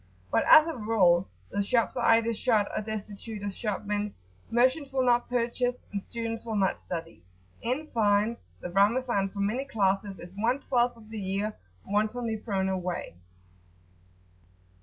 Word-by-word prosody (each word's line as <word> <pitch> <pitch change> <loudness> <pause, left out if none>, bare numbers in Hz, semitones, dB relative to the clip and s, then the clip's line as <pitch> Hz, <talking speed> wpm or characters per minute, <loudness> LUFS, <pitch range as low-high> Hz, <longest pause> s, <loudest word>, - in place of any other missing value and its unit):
But - - +2
as 310 0 +10
a 330 -1 -3
rule 195 -6 +3 0.2
the 200 - 0
shops 230 +3 +1
are 235 -2 +4
either 230 0 +1
shut 220 -3 +2
or - - 0
destitute 215 0 -6
of 200 -1 -3
shopmen, 205 -1 -2 0.3
merchants 260 +5 +2
will 260 -1 +1
not 240 -1 +3
purchase, 245 +1 -1
and 200 -1 -2
students 230 +1 -5
will 225 -2 -3
not 195 -2 +1
study. 165 - -6 0.4
In 255 +7 -1
fine, 215 -2 +2 0.3
[p.76]the 175 - -5
Ramazan, 205 0 +3
for 200 +1 -5
many 220 +7 0
classes, 200 -5 0
is 175 +1 -11
one 235 +6 +1
twelfth 245 -3 +1
of 220 -1 -15
the 220 - -4
year 200 +2 -2 0.3
wantonly 220 +3 0
thrown 195 -3 -1
away. 180 - -3
215 Hz, 155 wpm, -28 LUFS, 200-240 Hz, 0.4 s, as